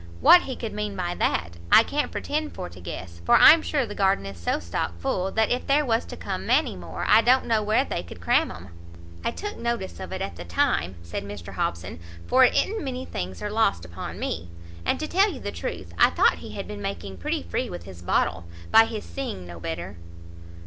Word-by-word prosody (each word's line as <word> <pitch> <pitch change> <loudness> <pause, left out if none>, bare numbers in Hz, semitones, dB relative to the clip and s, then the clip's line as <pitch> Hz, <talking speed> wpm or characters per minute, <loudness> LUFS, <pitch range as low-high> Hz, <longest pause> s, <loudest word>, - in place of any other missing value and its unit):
what 355 - +8
he 260 - -5
could 225 - -5
mean 210 -1 -3
by 175 -2 -2
that, 85 - -1
I 225 - +9
can't 295 +5 -2
pretend 305 +1 -3
for - - -5
to 90 +1 -13
guess, 85 0 -8
for - - +5
I'm 320 +1 +9
sure 285 -5 0
the 210 - -7
garden 195 - +2
is 100 -3 -8
so 85 - 0
stock 85 0 -3
full, 185 - -1
that 220 -1 +2
if 245 - -1
there 290 +2 +3
was 230 -2 +1
to - - -9
come - - -4
many - - +2
more, - - -6
I 220 - +7
don't 255 +3 +4
know 225 -2 +2
where 215 +6 +2
they - - -3
could 85 0 -11
cram 85 - +2
'em." 90 +3 -10 0.5
"I - - +1
took 415 +1 -6
notice 235 -5 -3
of - - -7
it 190 - -4
at 190 - -5
the 85 - -6
time," 85 +1 0
said 85 +3 -5
Mr 100 -4 -8
Hobson, 85 0 -3 0.3
"for 260 +1 +5
it 255 - +4
i'n't 435 -1 +1
many 260 -1 -4
things 90 +1 -5
are 210 - -3
lost 210 - +1
upon 85 0 -7
me; 85 +1 -4 0.4
and, - - +1
to 310 - -3
tell 390 +5 +3
you 280 - -7
the 205 - -4
truth, 85 - -6
I - - +7
thought - - +3
he - - -9
had - - -6
been 105 -1 -7
making 95 -1 -5
pretty 90 - -2
free 85 - -2
with 85 -1 -7
his 90 -1 -11
bottle, 85 -1 0 0.3
by 225 0 +8
his 220 -2 -5
seeing 260 - -5
no 85 -1 -9
better." 85 +3 -5
175 Hz, 230 wpm, -25 LUFS, -, 0.5 s, I